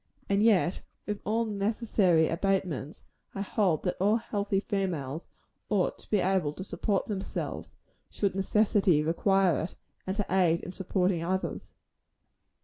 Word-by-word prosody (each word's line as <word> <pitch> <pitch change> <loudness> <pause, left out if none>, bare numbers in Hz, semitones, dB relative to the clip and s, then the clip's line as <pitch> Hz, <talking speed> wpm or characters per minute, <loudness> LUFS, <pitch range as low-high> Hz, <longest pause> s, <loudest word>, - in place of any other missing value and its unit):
And 200 0 +2
yet, 200 -5 +3 0.2
with 210 -1 -3
all 225 +2 +1
necessary 200 -5 +2
abatements, 175 -5 -1 0.3
I 195 - -3
hold 195 -5 +1
that 180 - -1
all 205 +4 +3
healthy 205 -3 -1
females 170 -8 -3 0.4
ought 200 -4 +1
to - - -15
be 210 - +3
able 185 -5 +1
to 185 - -7
support 190 +2 -1
themselves, 195 -3 -5 0.3
should 200 -3 -1
necessity 195 -4 +3
require 185 +2 +2
it, 165 - -5 0.3
and 190 +2 -2
to 205 - 0
aid 175 -3 +3
in - - -7
supporting 185 -2 0
others. 185 +2 -3
190 Hz, 140 wpm, -29 LUFS, 175-205 Hz, 0.4 s, yet